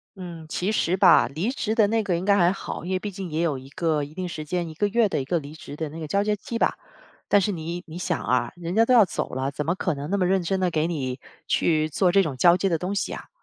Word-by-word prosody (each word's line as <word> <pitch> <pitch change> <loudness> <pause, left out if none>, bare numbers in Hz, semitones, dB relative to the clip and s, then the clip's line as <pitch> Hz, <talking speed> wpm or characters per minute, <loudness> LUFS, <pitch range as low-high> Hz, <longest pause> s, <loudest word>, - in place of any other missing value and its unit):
嗯， 175 -4 -8
其 185 +5 -1
实 185 -4 +1
吧， 180 -9 +6
离 170 - -1
职 225 -5 -2
的 220 -3 +4
那 225 +1 +1
个 180 -4 0
应 180 - -4
该 200 0 +4
还 175 -3 +4
好， 195 - -6
因 180 - -5
为 185 - +1
毕 205 +2 -5
竟 190 -1 -6
也 155 +1 -1
有 160 -5 0
一 130 +1 -11
个 155 0 0
一 145 +1 -8
定 185 +2 -4
时 160 -3 -6
间， 175 +3 -2
1 - - -8
个 205 +6 0
月 225 +2 +3
的 185 - -1
一 - - -5
个 170 +4 0
离 145 0 -10
职 155 -2 -9
的 160 +1 -3
那 160 +3 -8
个 155 - -5
交 200 +6 +1
接 210 0 +1
期 230 +3 -5
吧。 - - +1 0.6
但 205 - +7
是 205 +1 0
你 170 0 -5
你 160 +1 -9
想 180 -1 -1
啊， 125 -1 +1
人 175 +1 -5
家 225 +1 +5
都 255 - +3
要 230 -4 +7
走 180 - -3
了， 135 +1 -1
怎 150 +1 -4
么 170 - 0
可 185 -2 -1
能 145 +1 -6
那 200 - +1
么 185 - +2
认 190 +1 +2
真 190 +3 -1
地 180 -1 +1
给 160 0 +1
你 135 -6 -3 0.3
去 155 -2 +2
做 180 +4 +2
这 195 +2 +5
种 150 -6 -3
交 170 +7 +5
接 195 - 0
的 165 - +1
东 185 +5 -3
西 195 0 -2
啊？ - - -8
175 Hz, 320 characters per minute, -25 LUFS, 155-195 Hz, 0.6 s, 但